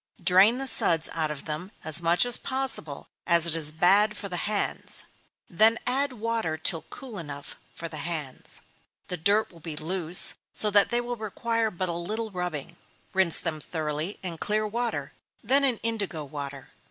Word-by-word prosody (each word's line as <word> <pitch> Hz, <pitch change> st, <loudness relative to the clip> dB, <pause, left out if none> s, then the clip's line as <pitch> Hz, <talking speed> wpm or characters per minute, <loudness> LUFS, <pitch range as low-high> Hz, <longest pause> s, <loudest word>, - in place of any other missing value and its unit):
Drain 190 Hz, +7 st, +5 dB
the 270 Hz, -, -4 dB
suds 170 Hz, -9 st, +3 dB
out 160 Hz, -2 st, -2 dB
of 150 Hz, -2 st, -7 dB
them 160 Hz, +5 st, -5 dB
as 160 Hz, +2 st, +8 dB
much 170 Hz, +6 st, +3 dB
as 245 Hz, -1 st, +5 dB
possible, 260 Hz, -, +1 dB, 0.2 s
as 170 Hz, -1 st, +6 dB
it 170 Hz, -, +1 dB
is 155 Hz, -2 st, +4 dB
bad 200 Hz, +6 st, +3 dB
for 200 Hz, -, -5 dB
the 180 Hz, -, -5 dB
hands; 210 Hz, -1 st, -2 dB, 0.4 s
then 220 Hz, +6 st, +4 dB
add 270 Hz, +2 st, 0 dB
water 225 Hz, -8 st, -2 dB
till 160 Hz, +1 st, +2 dB
cool 235 Hz, -7 st, -8 dB
enough 145 Hz, -3 st, -8 dB, 0.2 s
for 165 Hz, -, -5 dB
the 155 Hz, -1 st, -8 dB
hands. 150 Hz, -3 st, -3 dB, 0.5 s
The 180 Hz, -, -4 dB
dirt 200 Hz, +6 st, +2 dB
will 170 Hz, -, -16 dB
be 160 Hz, -1 st, -7 dB
loose, 175 Hz, +1 st, +3 dB, 0.2 s
so 210 Hz, -, +1 dB
that 205 Hz, 0 st, +4 dB
they 240 Hz, 0 st, 0 dB
will 240 Hz, 0 st, -5 dB
require 230 Hz, +1 st, -2 dB
but 185 Hz, -2 st, -4 dB
a -, -, -2 dB
little 215 Hz, +6 st, -4 dB
rubbing. 170 Hz, -3 st, -5 dB, 0.4 s
Rinse 190 Hz, -4 st, +3 dB
them 160 Hz, -3 st, -4 dB
thoroughly 155 Hz, +4 st, -4 dB
in 170 Hz, -3 st, -6 dB
clear 215 Hz, +1 st, 0 dB
water, 235 Hz, +2 st, -3 dB, 0.3 s
then 275 Hz, +2 st, +2 dB
in 255 Hz, -4 st, +2 dB
indigo 205 Hz, -9 st, -3 dB
water. 140 Hz, -1 st, -8 dB
180 Hz, 180 wpm, -26 LUFS, 160-220 Hz, 0.5 s, as